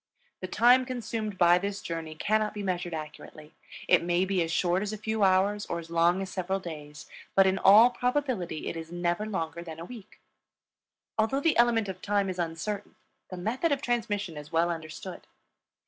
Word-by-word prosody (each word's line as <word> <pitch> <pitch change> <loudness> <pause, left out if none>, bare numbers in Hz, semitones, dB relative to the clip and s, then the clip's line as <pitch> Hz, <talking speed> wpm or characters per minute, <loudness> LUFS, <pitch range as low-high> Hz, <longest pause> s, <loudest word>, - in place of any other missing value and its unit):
The 185 - -5
time 245 +7 +5
consumed 225 -5 -4
by 175 0 +5
this 200 +1 -3
journey 165 -2 -5
cannot 215 +5 0
be 205 - -4
measured 175 -3 -2
accurately; 155 0 -9 0.3
it - - +5
may 175 +2 +1
be 190 -1 0
as 165 -1 -1
short 175 +2 +1
as 210 0 -3
a 215 - -5
few 220 +1 -3
hours 195 +2 +2
or 170 - -2
as 165 0 -9
long 170 +3 +3
as 190 - -7
several 190 +1 -2
days, 150 -4 -9 0.3
but 195 - +6
in 190 0 +2
all 215 +6 +7
probability 245 - -2
it - - -3
is 165 0 -7
never 175 +4 -1
longer 170 -5 -3
than 165 -2 -9
a 165 - -7
week. 220 -2 -12 1.0
Although 225 +6 +1
the 325 +1 +2
element 235 -3 +3
of 185 -1 -6
time 200 -2 0
is 185 - -7
uncertain 175 +5 -4 0.3
the 185 - -7
method 240 - -1
of 280 0 0
transmission 205 -8 -2
is 150 +1 -9
well 170 +1 +2
understood. 165 +3 -7
190 Hz, 190 wpm, -28 LUFS, 170-215 Hz, 1.0 s, all